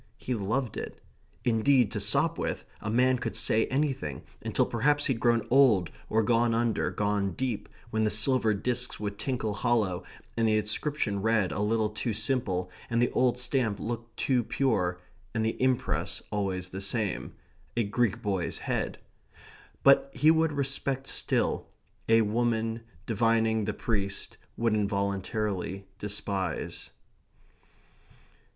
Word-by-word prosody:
He 125 - -3
loved 115 +3 -1
it. - - -6 0.5
Indeed 120 0 +3
to - - -2
Sopwith - - 0 0.2
a 110 - -3
man 125 +3 +3
could 120 -2 -3
say 110 +1 +2
anything, 130 - -1 0.2
until - - +1
perhaps 145 +5 +2
he'd 130 -4 0
grown 115 -2 +2
old, 120 -10 +5 0.2
or 110 +1 +3
gone 115 +1 +3
under, 115 -1 +1
gone 100 -2 0
deep, 120 -4 -3 0.2
when 110 0 +1
the 110 - +3
silver 110 +2 +4
disks 125 +5 -1
would 100 -1 -4
tinkle 120 -6 -1
hollow, 105 -4 +1 0.3
and 115 -1 +2
the 110 -1 +3
inscription 105 -1 -1
read 110 -3 +2
a - - -3
little 105 +1 +1
too 110 +2 -2
simple, 105 -5 0 0.2
and 115 - +1
the 120 - +2
old 125 -1 +2
stamp 125 -5 0
look 115 0 -5
too 125 -3 +1
pure, 100 -9 0 0.4
and 110 -1 +1
the 110 - -2
impress 130 -1 0
always 95 -3 -2
the 95 +1 -6
same 105 0 -2 0.4
a 120 - +3
Greek 110 +1 0
boy's 95 -4 -1
head. - - -2 0.9
But 140 0 +6
he 155 +2 +5
would 160 0 +3
respect 135 -1 -1
still. - - 0 0.4
A 115 0 +6
woman, 115 +1 0 0.2
divining 110 -1 +2
the 110 - -1
priest, 100 -4 -2 0.2
would, 115 -1 +2
involuntarily, 100 -1 -1
despise. 100 -4 -3
110 Hz, 140 wpm, -29 LUFS, 100-125 Hz, 0.9 s, But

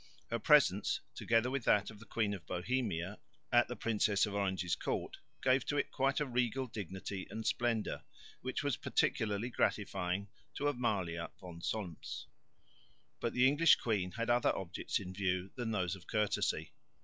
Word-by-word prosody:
Her - - 0
presence, - - +5
together 115 +2 +2
with 135 -2 -1
that 105 +1 +3
of 105 - -13
the 115 - -13
Queen 105 -3 0
of 95 -4 -8
Bohemia, 95 -2 -1 0.3
at - - +5
the - - -4
Princess 105 -2 +2
of 105 - -5
Orange's 95 -3 0
court - - -3 0.3
gave 130 +1 +4
to 145 - 0
it 140 - 0
quite 135 +1 +1
a 150 - +1
regal 125 0 0
dignity 95 -3 -5
and 110 0 -5
splendour, 120 -3 0 0.4
which 130 +2 -2
was 145 -6 0
particularly 105 +3 0
gratifying 90 -3 0 0.3
to 145 - 0
Amalia 95 -11 -1
von 85 -2 -9
Solms. 90 -4 -4 0.9
But 115 - -1
the 125 +1 +5
English 150 +3 +6
queen 100 -6 -1
had 115 +1 0
other 120 0 +3
objects 95 -3 -2
in 95 -1 -7
view 95 -1 -1
than 120 -3 -3
those 95 -3 0
of 95 - -14
courtesy. 105 -2 0
105 Hz, 160 wpm, -35 LUFS, 95-125 Hz, 0.9 s, English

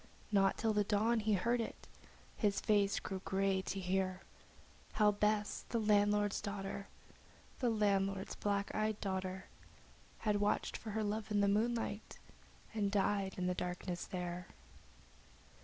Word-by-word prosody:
Not 195 -2 +4
till 220 -1 +1
the 210 0 +3
dawn 220 +3 +2
did 210 - -6
he 215 - +3
hear 230 +6 +1
it, 245 - +2
and 225 - -3 0.6
his 205 -3 +1
face 205 -1 +2
grew 190 -2 -5
grey 195 0 +1
to 195 +1 -3
hear 185 0 0 0.7
How 210 -1 +5
Bess, 210 0 0
the 235 - 0
landlord's 205 -1 +3
daughter, 200 -1 -4 0.7
The 245 - +2
landlord's 195 -3 +1
black 200 -1 -1
eyed 215 0 0
daughter, 190 -1 -3 0.7
Had 210 -2 0
watched 205 - +1
for 225 - -6
her 220 - +1
love 215 +1 -2
in 205 -1 +2
the 200 - +4
moonlight, 220 +1 0 0.6
and 205 -2 0
died 200 -1 +1
in 180 - -1
the 180 - +1
darkness 180 0 -3
there. 180 -1 -4
205 Hz, 150 wpm, -36 LUFS, 195-210 Hz, 0.7 s, How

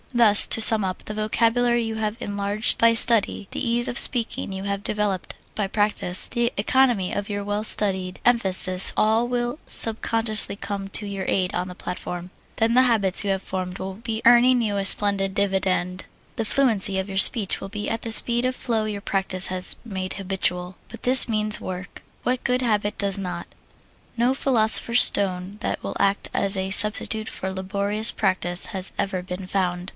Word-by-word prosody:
Thus, 225 -4 +4
to - - +1
sum 220 -1 +8
up, 185 -1 -6
the 215 - -7
vocabulary 230 +3 0
you 225 -1 -5
have 215 0 -4
enlarged 205 +1 0
by 230 0 +3
study, 225 -3 +3
the - - -5
ease 240 0 -1
in - - -5
speaking 235 -5 +2
you 190 0 -7
have 200 0 -5
developed 210 -4 -4 0.2
by 205 -2 -2
practise, 205 -3 0
the 240 -1 -2
economy 225 -3 0
of 205 0 -5
your 205 -1 -5
well 205 +1 -3
studied 190 -4 +3
emphasis 190 -5 +1
all 220 +2 +1
will 245 +3 -4
subconsciously 225 -2 0
come 200 -1 -7
to 210 - -2
your 200 -1 -6
aid 185 -2 -1
on 180 +1 -4
the 180 - -10
platform. 180 0 -8 0.3
Then 225 +1 0
the 255 - +4
habits 215 -8 +2
you 200 - -4
have 190 0 -4
formed 185 -1 -6
will 190 0 -7
be 225 +2 -6
earning 245 +1 +4
you 210 -3 -3
a 200 - -2
splendid 195 0 +3
dividend. 190 -2 -2 0.3
The 225 - -4
fluency 210 -6 +2
of 190 - -5
your 195 -1 -7
speech 205 -2 +4
will 195 - -8
be 210 0 -6
at 225 - -4
the 230 - -6
speed 235 +2 +6
of 255 0 -2
flow 230 -4 -3
your 210 -2 -6
practise 190 -2 -1
has 185 0 0
made 190 -4 -6
habitual. 185 -2 -3
But 230 - -12
this 255 0 +8
means 215 -1 -1
work. 185 -1 -9 0.2
What 250 0 -2
good 250 +1 -1
habit 210 -3 -2
does 200 -1 -1
not? 180 -2 -7 0.7
No 240 +3 +1
philosopher's 235 -2 +2
stone 190 0 -1
that - - -4
will - - -7
act 200 0 -1
as 195 0 -1
a 190 0 -4
substitute 215 +2 +1
for 190 - -6
laborious 200 +3 -2
practise 180 -3 -1
has 190 -1 -4
ever 190 -2 -3
been 180 +1 -8
found. 180 -1 -3
205 Hz, 185 wpm, -22 LUFS, 190-230 Hz, 0.7 s, sum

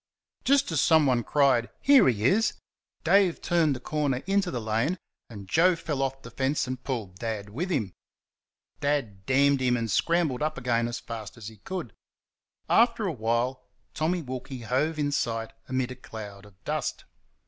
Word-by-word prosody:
Just 275 -6 +3
as 155 -3 +2
someone 140 -7 +4
cried 135 -3 +3
"Here 275 - +6
he 110 -3 -1
is!" 215 - +3 0.5
Dave 195 -4 +4
turned 165 -5 +2
the - - -6
corner 140 -1 -1
into 195 -1 +1
the 125 - -3
lane, 115 +10 0 0.3
and 100 -4 -9
Joe 175 - +4
fell 155 -4 -3
off 135 0 -2
the - - -10
fence 135 +2 0
and 130 -1 -5
pulled 105 -9 -4
Dad 110 -3 -4
with 160 - -3
him. 110 - -1 0.9
Dad 135 -10 -2
damned 140 +1 +4
him 125 -1 +2
and 115 -2 -2
scrambled 165 -7 +1
up 155 +1 -1
again 120 -2 0
as 120 - -4
fast 115 -1 -8
as 110 -2 -7
he 110 - -15
could. 165 - -6 0.7
After 230 -2 +3
a 185 - 0
while 120 +1 -1 0.3
Tommy 170 +2 0
Wilkie 130 0 -6
hove 135 +8 0
in 145 -1 0
sight 115 -4 -2
amid 130 -1 -1
a - - -6
cloud 105 -5 -9
of 95 -3 -23
dust. - - -3
130 Hz, 170 wpm, -27 LUFS, 115-155 Hz, 0.9 s, Here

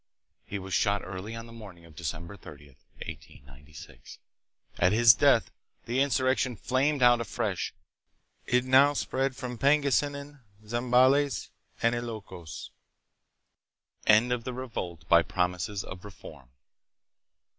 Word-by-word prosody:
He 100 - -4
was 95 -1 -7
shot 100 +1 +1
early 95 +4 -7
on 115 0 -7
the 115 - -13
morning 100 -7 -12
of 80 -2 -17
December 85 +4 -6
30, 75 -5 -13 0.4
1896. 70 +3 -12 0.6
1 - - -1
At 90 +3 +4
his 115 0 +7
death - - +3 0.3
the 125 +3 0
insurrection 130 -2 +1
flamed 130 +5 0
out 120 -1 +6
afresh. 115 - -3 0.8
It 125 0 +2
now 135 +3 +5
spread 135 -1 -1
to 125 -2 -6
Pangasinan, 145 +1 +1 0.3
Zambales, 125 +5 +2 0.3
and 115 +1 +3
Ilokos. 110 -8 -7 1.4
End 110 +4 +5
of 120 -2 -3
the 130 - -5
Revolt 110 -10 -6
by 85 0 +6
Promises 90 +2 -2
of 90 -1 -10
Reform. 80 -9 -12
115 Hz, 125 wpm, -28 LUFS, 90-130 Hz, 1.4 s, his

